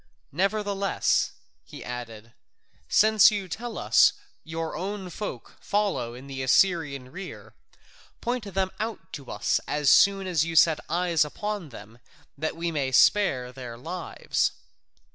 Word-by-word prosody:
Nevertheless," 200 Hz, +3 st, 0 dB, 0.3 s
he -, -, -11 dB
added, 115 Hz, -2 st, -8 dB, 0.6 s
"since 215 Hz, -1 st, +6 dB
you 205 Hz, -3 st, -3 dB
tell 235 Hz, +7 st, -6 dB
us -, -, +5 dB, 0.3 s
your 165 Hz, 0 st, -4 dB
own 190 Hz, +2 st, -5 dB
folk 210 Hz, +4 st, -7 dB
follow 200 Hz, -, -1 dB
in 130 Hz, +2 st, -11 dB
the 135 Hz, -1 st, -6 dB
Assyrian 140 Hz, -2 st, +2 dB
rear, 190 Hz, +4 st, -9 dB, 0.7 s
point 240 Hz, -4 st, -3 dB
them 190 Hz, 0 st, -1 dB
out 220 Hz, -6 st, -5 dB
to 140 Hz, -4 st, -8 dB
us -, -, 0 dB
as 150 Hz, -2 st, +2 dB
soon 195 Hz, -1 st, +5 dB
as 175 Hz, -5 st, +1 dB
you 165 Hz, 0 st, -4 dB
set 160 Hz, 0 st, +5 dB
eyes 175 Hz, -2 st, +2 dB
upon 205 Hz, +3 st, -4 dB
them, 115 Hz, -1 st, -12 dB, 0.4 s
that 155 Hz, +3 st, -3 dB
we 170 Hz, 0 st, -2 dB
may 140 Hz, -4 st, -1 dB
spare 130 Hz, -4 st, +3 dB
their 125 Hz, -3 st, -8 dB
lives." 170 Hz, +7 st, -2 dB
165 Hz, 135 wpm, -26 LUFS, 135-195 Hz, 0.7 s, since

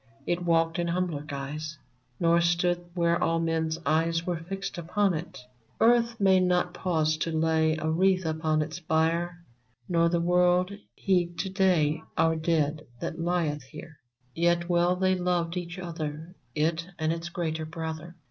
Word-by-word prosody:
It 175 Hz, +1 st, -1 dB
walked 165 Hz, -1 st, +2 dB
in 170 Hz, -, 0 dB
humbler 170 Hz, -4 st, -1 dB
guise, 150 Hz, +1 st, -6 dB, 0.4 s
Nor 170 Hz, 0 st, +4 dB
stood 175 Hz, +1 st, +1 dB
where 170 Hz, -1 st, +2 dB
all 165 Hz, 0 st, +2 dB
men's 160 Hz, -1 st, 0 dB
eyes 165 Hz, +1 st, +1 dB
Were 175 Hz, -2 st, -1 dB
fixed 190 Hz, +1 st, -5 dB
upon 190 Hz, +3 st, +1 dB
it. 165 Hz, +2 st, -5 dB, 0.4 s
Earth 235 Hz, 0 st, +3 dB
may 190 Hz, -2 st, +5 dB
not 180 Hz, -1 st, +1 dB
pause 160 Hz, -4 st, 0 dB
to 165 Hz, -, -2 dB
lay 160 Hz, 0 st, +2 dB
A 155 Hz, -, -3 dB
wreath 185 Hz, +3 st, +2 dB
upon 155 Hz, -1 st, +1 dB
its 155 Hz, +3 st, -7 dB
bier, 170 Hz, +2 st, 0 dB, 0.4 s
Nor 170 Hz, -1 st, +3 dB
the 170 Hz, 0 st, +1 dB
Avorld 180 Hz, +2 st, +3 dB, 0.2 s
heed 175 Hz, -3 st, 0 dB
to 190 Hz, +3 st, -2 dB
day 170 Hz, -6 st, +2 dB, 0.2 s
Our 165 Hz, 0 st, +3 dB
dead 155 Hz, -2 st, 0 dB
that 160 Hz, -, -4 dB
lieth 165 Hz, -3 st, 0 dB
here! 145 Hz, +4 st, -12 dB, 0.3 s
Yet 170 Hz, +1 st, +1 dB
well 175 Hz, 0 st, +3 dB
they 185 Hz, 0 st, +2 dB
loved 175 Hz, -2 st, 0 dB
each 175 Hz, 0 st, -5 dB
other 165 Hz, -2 st, -5 dB
— 120 Hz, -, -39 dB, 0.2 s
It 170 Hz, +1 st, -7 dB
and 155 Hz, 0 st, 0 dB
its 165 Hz, 0 st, -5 dB
greater 160 Hz, -3 st, -3 dB
brother. 160 Hz, +1 st, -6 dB
170 Hz, 160 wpm, -27 LUFS, 160-180 Hz, 0.4 s, may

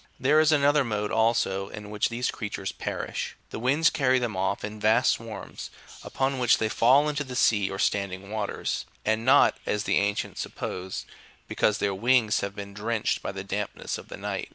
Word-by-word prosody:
There 145 Hz, +4 st, +4 dB
is 155 Hz, 0 st, +4 dB
another 145 Hz, -1 st, +4 dB
mode, 105 Hz, -3 st, -2 dB
also, 110 Hz, -4 st, +1 dB
in 105 Hz, -1 st, -9 dB
which 105 Hz, -1 st, 0 dB
these 120 Hz, +1 st, -1 dB
creatures 100 Hz, -3 st, -4 dB
perish; -, -, -4 dB, 0.2 s
the -, -, -5 dB
winds 140 Hz, +7 st, +3 dB
carry 130 Hz, -5 st, +2 dB
them 120 Hz, -5 st, -2 dB
off 95 Hz, +1 st, -1 dB
in 105 Hz, +1 st, -5 dB
vast 110 Hz, +4 st, +4 dB
swarms, 110 Hz, -4 st, -6 dB, 0.3 s
upon 135 Hz, 0 st, -1 dB
which 120 Hz, -2 st, +4 dB
they 110 Hz, -, 0 dB
fall 130 Hz, +7 st, +4 dB
into 150 Hz, -1 st, -1 dB
the 130 Hz, -2 st, -8 dB
sea 105 Hz, -5 st, +3 dB
or 95 Hz, -, -5 dB
standing 100 Hz, 0 st, -1 dB
waters, 110 Hz, -2 st, -3 dB, 0.2 s
and 110 Hz, +1 st, +1 dB
not, 135 Hz, +3 st, +5 dB
as 105 Hz, 0 st, 0 dB
the 100 Hz, -, +1 dB
ancients 100 Hz, 0 st, -2 dB
sup -, -, -7 dB
posed, 90 Hz, +1 st, -5 dB, 0.4 s
because 105 Hz, -, +1 dB
their 100 Hz, -2 st, 0 dB
wings 115 Hz, +2 st, +3 dB
have 100 Hz, 0 st, -4 dB
been 100 Hz, -1 st, -7 dB
drenched 110 Hz, +2 st, -1 dB
by -, -, -4 dB
the 95 Hz, -1 st, -6 dB
damp 100 Hz, +1 st, -3 dB
ness -, -, -4 dB
of -, -, -12 dB
the -, -, -8 dB
night. -, -, -4 dB
110 Hz, 200 wpm, -26 LUFS, 100-130 Hz, 0.4 s, not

